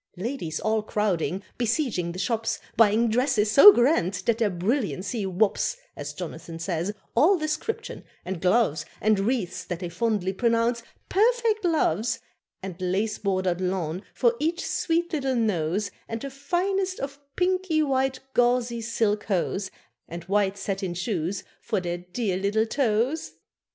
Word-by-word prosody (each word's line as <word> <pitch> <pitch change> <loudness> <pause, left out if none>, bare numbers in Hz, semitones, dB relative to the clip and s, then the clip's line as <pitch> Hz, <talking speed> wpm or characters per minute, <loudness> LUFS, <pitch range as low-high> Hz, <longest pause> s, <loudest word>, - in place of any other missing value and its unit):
Ladies 185 - -3
all 220 0 +1
crowding, 195 -3 -1 0.2
besieging 230 - 0
the 175 - -8
shops, 225 +3 -1 0.2
Buying 225 +1 +4
dresses 220 -2 +2
so 350 - +11
grand 240 - +2
that 230 0 +2
their 220 -3 +3
brilliancy 200 +3 -1
whops 200 - +1 0.2
(As - - -6
Jonathan 165 -1 -7
says) 170 +2 -2 0.2
all 335 +11 +5
description, 310 +7 -3 0.2
and 185 -2 -4
gloves 180 -6 +2 0.2
And 215 -1 +3
wreaths 215 -2 -1
that 175 - -4
they 175 -2 -4
fondly 205 -2 0
pronounce 230 +2 +1 0.3
"perfect 450 0 +2
loves," 240 - +1 0.5
And 185 -1 -7
lace 195 +4 -1
bordered 185 -3 0
lawn 180 -2 -2
for 240 -2 +3
each 330 +4 -1
sweet 340 +1 0
little 270 -4 0
nose, 200 -3 0 0.2
And 225 - -4
the 275 +4 -6
finest 370 +7 -1
of 275 +1 -5 0.2
pinky 365 -3 +1
white 265 -2 0
gauzy 240 -1 +2
silk 220 -2 0
hose, 190 0 -1 0.4
And 170 0 -7
white 200 +1 +1
satin 195 -2 -3
shoes 180 0 -2 0.2
for - - -1
their 175 -1 -3
dear 180 +2 -2
little 205 +3 +1
toes. 245 +4 0
220 Hz, 140 wpm, -26 LUFS, 185-265 Hz, 0.5 s, so